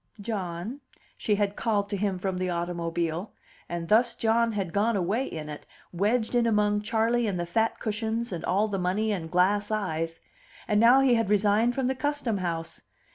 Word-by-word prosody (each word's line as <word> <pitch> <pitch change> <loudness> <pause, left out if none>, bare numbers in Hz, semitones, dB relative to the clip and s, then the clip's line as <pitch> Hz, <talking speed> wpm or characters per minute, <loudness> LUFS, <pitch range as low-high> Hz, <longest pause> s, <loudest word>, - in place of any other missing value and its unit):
"John," 200 +3 -4 0.3
she 210 - 0
had 205 0 0
called 205 -3 0
to 205 - -1
him 200 -1 -1
from 185 0 -2
the 185 0 -1
automobile; 170 +1 -2 0.4
and 170 -1 -4
thus 235 +4 +3
John 230 +1 +2
had 190 -5 -3
gone 215 +3 +2
away 200 +8 0
in 155 -2 -6
it, 150 -1 -8 0.3
wedged 220 +7 +1
in 240 -1 +3
among 210 -1 +2
Charley 225 +2 +1
and 190 -4 -2
the 175 - -1
fat 225 +6 0
cushions 225 +2 -2
and 170 -3 -4
all 200 +4 +1
the 200 -2 -2
money 195 +5 0
and 170 -5 -3
glass 195 +4 +2
eyes. 165 -6 -2 0.5
And 210 -1 +2
now 245 +4 +7
he 265 -2 +4
had 230 -4 +1
resigned 210 +3 +3
from 265 - 0
the 260 - +1
Custom 265 -5 -1
House! 165 -2 -3
205 Hz, 185 wpm, -27 LUFS, 180-225 Hz, 0.5 s, now